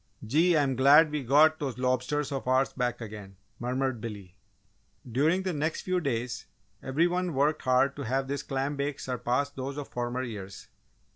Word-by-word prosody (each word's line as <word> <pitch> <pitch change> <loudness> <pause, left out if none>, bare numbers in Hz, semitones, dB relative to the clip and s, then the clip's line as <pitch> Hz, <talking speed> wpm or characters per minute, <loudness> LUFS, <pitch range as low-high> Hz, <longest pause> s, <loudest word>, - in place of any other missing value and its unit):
"Gee! 160 +9 +3
I'm 140 -3 +1
glad 145 +4 +6
we 150 -2 -2
got 155 +5 +5
those 135 -4 -3
lobsters 130 +3 0
of 135 -2 -4
ours 130 +1 +2
back 125 -2 -2
again!" 105 -3 -8 0.2
murmured 125 -1 -1
Billy. 100 -5 -8 0.7
During 155 +10 +1
the 185 -1 -1
next 155 +2 -1
few 185 0 0
days 125 -4 -3 0.3
every 140 +6 +1
one 180 -2 -1
worked 145 +3 +2
hard 130 +2 +2
to 140 - -4
have 135 +3 -1
this 140 0 -2
clam 140 +1 -2
bake 140 0 -3
surpass 125 +3 -1
those 135 +1 -5
of 145 - -6
former 120 +1 -3
years. 100 -5 -8
135 Hz, 170 wpm, -28 LUFS, 125-145 Hz, 0.7 s, glad